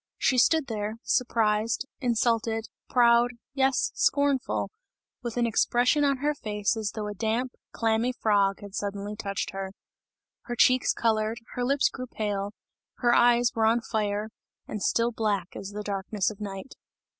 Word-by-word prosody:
She 255 - +2
stood 320 +4 +4
there, 215 -3 -3
surprised, 225 -1 +1
insulted, 230 -3 0 0.2
proud, 240 0 +4 0.2
yes, 270 -1 +2
scornful; 285 -2 +1 0.5
with 235 -1 -5
an 240 - +3
expression 245 +5 +2
on 280 -1 +2
her 300 - +3
face 210 -5 -1
as 215 -3 -3
though 215 -1 -3
a 210 - -4
damp, 225 +5 -1 0.2
clammy 225 +2 +1
frog 205 -4 +1
had 200 -1 -10
suddenly 205 +1 -4
touched 200 -2 -3
her. 195 0 -5 0.7
Her 240 - -4
cheeks 255 +2 +4
coloured, 220 0 0 0.2
her 245 - -2
lips 275 +3 +3
grew 255 -1 -6
pale, 205 -3 -3 0.4
her 240 -1 +2
eyes 240 0 +5
were 220 -1 +2
on 230 +2 +3
fire, 215 -1 -2 0.4
and 210 - -5
still 230 +4 +2
black 205 -5 -1
as 195 - -6
the 210 +1 -6
darkness 200 0 -1
of 215 - -12
night. 195 +4 -6
225 Hz, 155 wpm, -27 LUFS, 210-245 Hz, 0.7 s, eyes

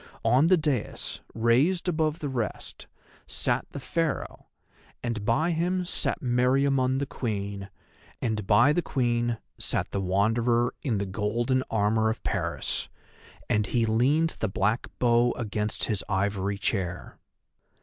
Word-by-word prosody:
On 135 +6 +5
the 185 +1 +5
daïs, 150 -8 -2 0.2
raised 130 +12 +2
above 155 -2 0
the 145 - -2
rest, 120 -5 -4 0.4
sat - - -1
the 140 - -7
Pharaoh, 165 +2 -2 0.6
and 115 -4 -2
by 155 +11 +2
him 180 +2 0
sat - - -1
Meriamun 130 +1 +2
the 140 - -1
Queen, 100 -6 -4 0.5
and 110 -4 -2
by 125 +8 +5
the 175 - +1
Queen 120 -5 0 0.2
sat - - -2
the 100 - -1
Wanderer 115 +6 +2
in 120 -7 0
the 100 - -1
golden 115 +6 0
armour 110 +1 +2
of 110 - -4
Paris, - - -2 0.6
and 105 +1 +1
he 120 -2 +1
leaned 135 +9 +2
the 110 - 0
black 100 +5 0
bow 120 0 +3
against 105 -2 -3
his 105 -4 0
ivory 100 0 0
chair. 95 -3 -3
120 Hz, 135 wpm, -27 LUFS, 105-135 Hz, 0.6 s, On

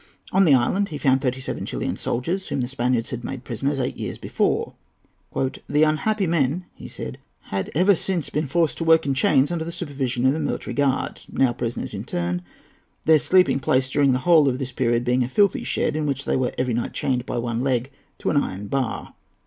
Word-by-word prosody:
On 195 0 +4
the 145 -5 +6
island 190 +11 +1
he 150 - -5
found 135 -2 +2
thirty 130 -1 -1
seven 130 - -4
Chilian - - -3
soldiers, 170 +11 -2
whom 135 - -2
the 125 - -1
Spaniards 125 -2 0
had 120 -1 -5
made 130 0 -5
prisoners 135 +4 -2
eight 125 - -2
years - - -4
before. - - -1 0.6
"The 145 +3 0
unhappy 190 +7 +1
men," 165 +1 0
he - - -10
said, - - -7 0.3
"had 95 -1 -2
ever 185 +5 +5
since 180 -2 -1
been 150 0 -1
forced 160 0 +1
to - - -1
work 160 0 +5
in 140 - +1
chains 135 +2 +3
under 170 -2 -1
the 170 - -5
supervision 135 -7 -2
of 130 - +5
a 155 - -2
military 145 - -3
guard—now 135 -2 0
prisoners 120 -2 -4
in 100 +2 -5
turn; 90 -2 -2 0.6
their 160 -1 +6
sleeping 180 -3 +4
place 130 0 +1
during 140 -1 +3
the 130 - +2
whole 160 -5 +6
of 125 - -1
this 130 -1 -4
period 120 -1 +1
being 125 +1 +2
a - - -2
filthy 200 +6 +2
shed, 150 - -1
in 155 -1 -1
which 140 0 -2
they - - +1
were 130 -2 -1
every 125 -1 0
night 120 +1 -2
chained 125 -2 -1
by - - -3
one 120 -1 -2
leg 130 0 0 0.3
to - - -1
an 150 - +1
iron 100 -7 -1
bar." 130 +2 -2
135 Hz, 215 wpm, -23 LUFS, 125-155 Hz, 0.6 s, the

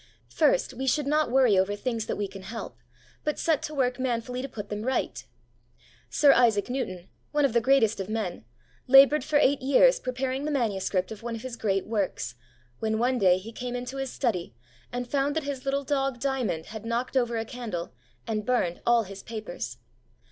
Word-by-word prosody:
First, - - +2
we 265 +2 -4
should 290 +3 +2
not 300 0 +2
worry 250 -4 +4
over 195 +2 +1
things 225 0 -3
that - - -1
we 205 - -2
can 195 0 -10
help, 220 +4 -7 0.4
but 300 - -1
set 320 -3 +1
to 305 - -5
work 255 -2 0
manfully 250 0 -2
to 275 - -5
put 210 -4 -7
them 210 0 -3
right. 235 - -1 0.9
Sir 285 -2 +5
Isaac 235 -2 +3
Newton, 185 -9 -4 0.2
one 295 -1 +3
of 270 - 0
the 235 - +3
greatest 230 -4 +3
of 195 +1 -4
men, 215 - -3 0.4
laboured 275 +3 +7
for 305 - -3
eight 285 -1 +3
years 280 - +5
preparing 260 +1 -2
the - - -1
manuscript 200 -8 0
of 215 - -8
one 235 0 -4
of 225 - -8
his 255 -2 -5
great 195 -4 0
works, 200 - -2 0.5
when 220 0 0
one 250 +2 +1
day 185 -3 +5
he 205 +5 -8
came 245 +2 -5
into 250 +2 -5
his 270 -1 -3
study, 180 - -2 0.4
and 245 0 -3
found 285 +2 0
that 320 - 0
his 275 -2 -5
little 275 +1 0
dog, 270 -2 -1
Diamond, 240 -11 -1
had 220 -1 -7
knocked 235 +3 -2
over 240 -2 +1
a 225 - -2
candle, 225 -8 -5 0.3
and 215 -1 -2
burned 205 -8 0
all 235 -1 +5
his 195 -1 -9
papers. 215 - -6
240 Hz, 200 wpm, -27 LUFS, 210-270 Hz, 0.9 s, laboured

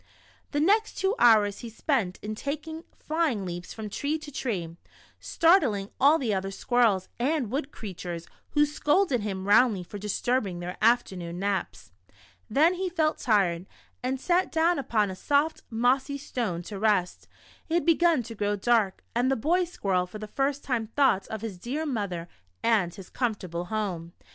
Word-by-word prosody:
The 290 - -1
next 420 +8 +2
two 385 +1 +1
hours 210 -4 +5
he 235 - -7
spent 225 -5 -1
in 215 +1 -3
taking 310 +7 -5
flying 300 - -1
leaps 175 0 -6
from 220 -1 -6
tree 285 +9 -2
to 305 -1 -10
tree, 185 - -3 0.4
startling 275 - +3
all 290 +4 +6
the 240 -8 -1
other 195 0 -1
squirrels 210 -2 +1
and 260 -3 0
wood 280 +2 -2
creatures, 175 -5 -6 0.3
who 295 -1 +5
scolded 295 - +1
him 195 -2 -4
roundly 205 -2 +4
for 205 +4 -8
disturbing 210 -2 -1
their 180 +1 -5
afternoon 190 -7 +1
naps. 195 +1 -3 0.6
Then 305 +10 +4
he 370 +1 -2
felt 315 -3 0
tired, 190 -5 +1 0.3
and 255 +1 -2
sat 360 +6 +1
down 330 0 +2
upon 215 -7 0
a - - -6
soft 290 +10 +1
mossy 260 +4 +1
stone 220 -11 -3
to 200 +2 -7
rest. 200 -4 +1 0.4
It 325 - 0
had 345 - +1
beo^un 335 -6 +3
to 230 0 -8
orrow 205 0 +1
dark, 220 -3 +2
and 245 +2 +2
the 270 - +1
bov 345 +9 +1
squirrel 190 - -1
for 195 - -9
the 215 - -6
first 275 +5 -1
time 235 -4 -1
thought 230 -5 +2
of 220 -1 -5
his 210 -5 -6
dear 275 - -3
mother 200 - -3 0.4
and 210 -7 +2
his 190 0 -12
comfortable 185 -8 -2
home. 180 -5 -3
230 Hz, 170 wpm, -27 LUFS, 195-290 Hz, 0.6 s, all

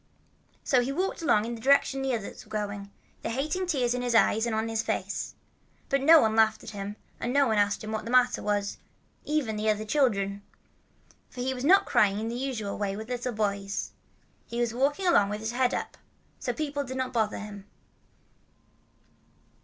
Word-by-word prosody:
So 255 -2 +3
he 250 +3 -2
walked 370 +6 -2
along 215 -10 +3
in 235 - -4
the 230 - -8
direction 270 +1 +3
the 265 -2 0
others 215 -3 -7
were - - -21
going, 205 -2 -4 0.3
the - - -3
hating 305 +9 -1
tears 255 -8 +1
in 250 - -2
his 245 -1 0
eyes 225 0 +4
and 225 - -1
on 220 +1 0
his 225 -1 0
face. - - -3 0.5
But 275 0 +2
no 320 +4 +8
one 220 0 +2
laughed 220 -1 +3
at - - -8
him, 200 0 -5 0.2
and 240 - -2
no 280 +1 +4
one 220 -4 +2
asked 205 +1 +1
him 215 - -5
what 220 0 -2
was - - -13 0.3
the - - -3
matter, 205 -1 +1 0.6
even 280 -8 -1
the 215 +1 0
other 215 0 0
children. 205 -6 +1 0.9
For 250 - -7
he 260 +1 0
was 250 -1 -6
not 375 +7 +6
crying 200 0 +3
in 225 +1 -3
the 235 - -4
usual 245 -6 -3
way 200 -1 -1
with 220 +3 -7
little 250 0 -2
boys. 200 -2 -2 0.6
He 235 - -4
was 240 -2 0
walking 285 +9 0
along 205 - +4
with 210 +1 -3
his 220 +1 -3
head 250 +1 +2
up. - - -4 0.4
So - - -1
people 290 -2 -3
did 260 -1 -6
not 260 0 -2
bother 220 -3 0
him. 205 -1 -8
230 Hz, 200 wpm, -28 LUFS, 210-265 Hz, 0.9 s, no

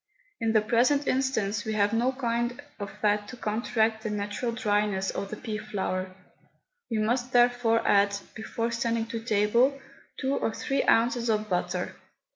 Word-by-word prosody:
In 225 -1 +1
the 215 - +5
present 250 +6 +2
instance 220 -7 0
we 220 - -3
have 205 0 +2
no 240 +3 +2
kind 240 -1 -1 0.2
of 200 -1 -4
fat 205 +1 0
to 255 - -9
counteract 220 0 0
the 220 - -3
natural 210 +3 -2
dryness 205 -4 0
of 195 - -4
the 215 - -6
pea 215 -3 -4
flour. 185 -3 -3 0.8
We 225 - -1
must 240 +4 0
therefore 245 -2 +3
add, 200 0 +4 0.2
before 230 +1 -3
sending 230 -1 0
to 230 - -3
table, 235 +5 +2 0.4
two 265 0 0
or 225 - -1
three 275 0 0
ounces 235 +1 +3
of 215 -1 +1
butter. 180 0 -1
225 Hz, 160 wpm, -27 LUFS, 210-240 Hz, 0.8 s, the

